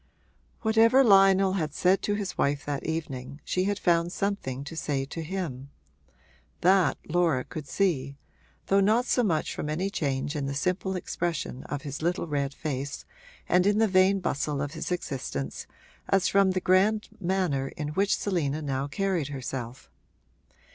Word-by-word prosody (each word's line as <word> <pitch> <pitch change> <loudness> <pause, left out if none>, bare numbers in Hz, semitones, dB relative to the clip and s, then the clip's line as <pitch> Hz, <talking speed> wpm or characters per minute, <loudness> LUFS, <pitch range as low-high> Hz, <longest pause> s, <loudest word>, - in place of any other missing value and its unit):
Whatever 230 +4 +5
Lionel 195 -3 +5
had 155 -6 -2
said 185 +2 +3
to 205 - 0
his 205 -2 -4
wife 140 0 0
that 145 -2 -3
evening 140 -4 -4
she 185 0 0
had 205 0 0
found 170 -2 +2
something 185 -11 -2
to 140 +4 -8
say 140 -4 -1
to 165 +4 -6
him: 155 -6 -5 0.9
that 185 0 +4
Laura 165 -6 +2
could 155 -4 -8
see, 140 -6 0 0.5
though 195 - +3
not 220 +5 +3
so 250 - +2
much 170 -9 0
from 150 - -4
any 180 +6 -1
change 140 -3 -2
in 140 -2 -2
the 140 - -3
simple 185 +5 -1
expression 170 -7 -3
of 145 -2 -5
his 145 0 -6
little 175 +3 0
red 140 -3 -1
face 140 -2 -4 0.4
and 180 +2 +3
in 205 0 +3
the 225 0 +4
vain 190 0 +4
bustle 150 -4 -1
of 145 0 -2
his 160 +2 -5
existence 130 - -4 0.4
as 195 -1 +3
from 195 -1 +4
the 185 - -1
grand 200 +4 +3
manner 175 -8 0
in 150 -1 -3
which 195 +6 +1
Selina 155 -7 -1
now 135 -1 -2
carried 180 -1 -1
herself. 130 -3 -6
170 Hz, 160 wpm, -27 LUFS, 140-195 Hz, 0.9 s, Whatever